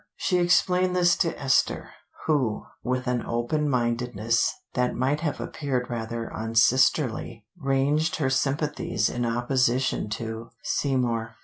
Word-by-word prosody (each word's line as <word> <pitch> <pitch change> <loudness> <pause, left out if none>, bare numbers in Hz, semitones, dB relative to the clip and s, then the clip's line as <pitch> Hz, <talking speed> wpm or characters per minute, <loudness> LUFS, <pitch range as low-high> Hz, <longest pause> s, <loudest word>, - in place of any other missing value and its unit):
She 180 -2 +1
explained 180 +1 +3
this 175 -1 +4
to 165 -3 0
Esther, 135 -2 +1 0.3
who, 135 -9 0 0.2
with 125 0 -2
an 125 -2 0
open 130 +6 -1
mindedness 120 -2 +1 0.2
that 125 0 0
might 135 +4 +1
have 150 -2 -2
appeared 130 -5 -3
rather 115 0 -4
unsisterly, 115 +1 +2
ranged 145 +1 +1
her 135 -4 0
sympathies 135 -4 0
in 120 -1 -1
opposition 125 0 +1
to 110 +1 -5
Seymour. 120 -5 -1
125 Hz, 120 wpm, -26 LUFS, 115-145 Hz, 0.3 s, this